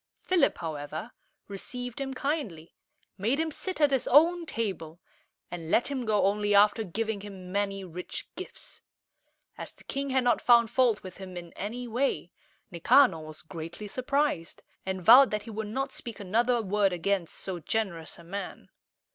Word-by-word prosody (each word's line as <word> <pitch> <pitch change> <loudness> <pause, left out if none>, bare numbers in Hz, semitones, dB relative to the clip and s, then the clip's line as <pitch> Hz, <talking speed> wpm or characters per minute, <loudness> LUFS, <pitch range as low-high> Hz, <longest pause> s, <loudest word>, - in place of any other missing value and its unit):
Philip, 360 -6 +3
however, 155 +5 -5 0.4
received 245 +6 -6
him 270 -1 -4
kindly, 255 - -3 0.5
made 235 +9 +1
him 320 0 0
sit 370 +4 -4
at 295 -2 +4
his 265 -2 +1
own 335 +5 +5
table, 175 - -3 0.5
and 165 -2 -6
let 245 +9 +2
him 260 -3 -2
go 210 -2 +3
only 205 +1 +2
after 210 +2 +5
giving 215 +2 -3
him 190 -3 -9
many 195 0 -1
rich 180 0 -6
gifts. - - -8 0.8
As - - -6
the - - -20
king 275 0 -3
had 260 -1 +2
not 240 -2 +2
found 235 -2 +5
fault 240 -4 +2
with 185 -1 -9
him 185 -2 -8
in 175 -1 -9
any 240 +5 -5
way, 250 +4 -1 0.4
Nicanor 175 - +5
was 155 0 -10
greatly 165 +5 -7
surprised, 255 - -1 0.2
and 190 -2 -3
vowed 260 +4 +9
that 210 -1 -2
he 230 - -9
would 220 0 -4
not 270 +6 -2
speak 235 -4 -6
another 230 +4 +1
word 200 -1 +2
against 180 0 -1
so 185 -2 -5
generous 170 -3 -2
a - - -13
man. 195 +4 -7
210 Hz, 165 wpm, -28 LUFS, 180-250 Hz, 0.8 s, vowed